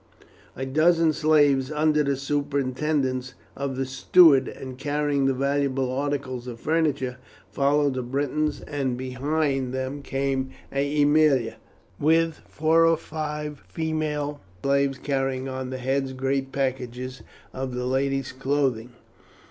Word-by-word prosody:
A 130 - -4
dozen 160 +3 +3
slaves 145 -3 +3
under 150 0 +2
the 140 -1 +1
superintendence 140 -1 -1 0.2
of 140 -1 -3
the 135 +1 -1
steward, 135 +1 +5
and 130 -1 -7
carrying 145 -1 +1
valuable 135 -1 0
articles 130 -2 -3
of 120 -2 -7
furniture, 145 -5 0 0.3
followed 145 0 +2
the 130 - -2
Britons, 145 +4 -1
and 135 -4 -2
behind 135 0 -1
them 130 +2 -3
came 135 -1 -1 0.2
Aemilia, 145 -3 +3 0.4
with 160 +1 +2
four 160 +2 +3
or 165 -1 +4
five 150 -2 -5
female 155 -2 -2 0.2
slaves 140 -1 +2
carrying 135 -2 -1
on 130 -1 -4
their 130 - -4
heads 135 +1 -1
great 135 +1 -1
packages 130 -2 -3 0.3
of 130 -1 -4
the 125 0 -2
ladies' 135 +1 0
clothing. 130 -3 -1
140 Hz, 120 wpm, -25 LUFS, 130-150 Hz, 0.4 s, steward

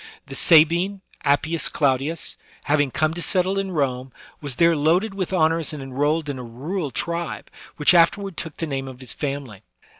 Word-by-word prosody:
The 135 - -9
Sabine, 170 +6 +4 0.2
Appius 155 +3 +1
Claudius, 140 +3 0 0.3
having 145 -1 +2
come 155 +4 0
to 175 - -5
settle 190 +2 +1
in 195 -1 -2
Rome, 135 -6 -1 0.3
was 145 -4 -4
there 170 +2 +4
loaded 170 +8 +2
with 190 -2 -3
honors 165 -3 +1
and 145 -3 -6
enrolled 145 +4 0
in 140 -3 -4
a - - -6
rural 145 +8 -4
tribe, 170 +6 -3 0.3
which 150 +4 +5
afterward 180 +2 +3
took 160 -2 -5
the 165 - -2
name 135 -3 -3
of 130 -1 -9
his 130 -2 -5
family. 135 -8 -5
155 Hz, 175 wpm, -23 LUFS, 140-170 Hz, 0.3 s, which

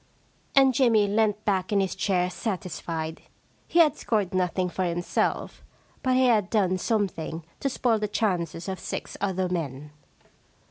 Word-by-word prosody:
* - - -30
And 270 -1 +6
Jimmy 230 -4 +4
leant 210 0 +1
back 190 -2 0
in 205 - +3
his 190 -1 0
chair 180 -2 0
satisfied. 170 -5 -4 0.5
He - - -1
had 310 -4 +6
scored 205 -4 -1
nothing 185 0 +1
for 185 +1 -2
himself, 175 0 -1 0.4
but 255 -1 +2
he 260 0 +4
had 215 -6 +3
done 185 -4 +1
some 215 0 +1
thing 160 -2 -6 0.2
to 275 - 0
spoil 240 -3 +1
the 210 - -1
chances 180 -5 -1
of 190 -2 -4
six - - -5
other 190 -2 0
men. 150 -5 -4
190 Hz, 165 wpm, -26 LUFS, 180-220 Hz, 0.5 s, And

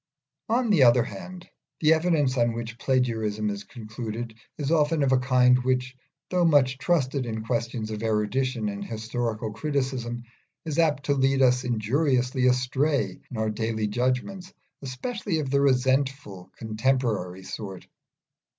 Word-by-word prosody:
On 235 0 +2
the 180 -8 +4
other 120 -1 +6
hand, 180 - -9 0.3
the 155 0 +5
evidence 160 -5 +1
on 120 -2 +2
which 115 0 -6
plagiarism 110 -5 0
is 100 0 -6
concluded 110 +1 -6 0.2
is 145 0 -2
often 155 -1 +2
of 135 - +2
a 130 - +4
kind 125 0 +4
which, 130 0 0 0.4
though 180 -1 +2
much 140 -5 +3
trusted 135 -7 0
in 110 -1 -4
questions 115 -1 -2
of 105 0 -4
erudition 115 +2 0
and 100 -1 -4
historical 110 0 -3
criticism, 125 -2 -2 0.4
is 155 0 -2
apt 150 -4 +2
to 140 - +1
lead 135 0 +2
us 125 0 +3
injuriously 125 +2 +1
astray 130 +4 +1
in 125 - -7
our 110 0 0
daily 110 0 -2
judgments, 130 - -2 0.3
especially 160 - -3
of 145 -4 -2
the 140 0 +3
resentful, 130 -6 0
condemnatory 110 -5 -1
sort. 95 -1 -7
125 Hz, 140 wpm, -26 LUFS, 110-140 Hz, 0.4 s, other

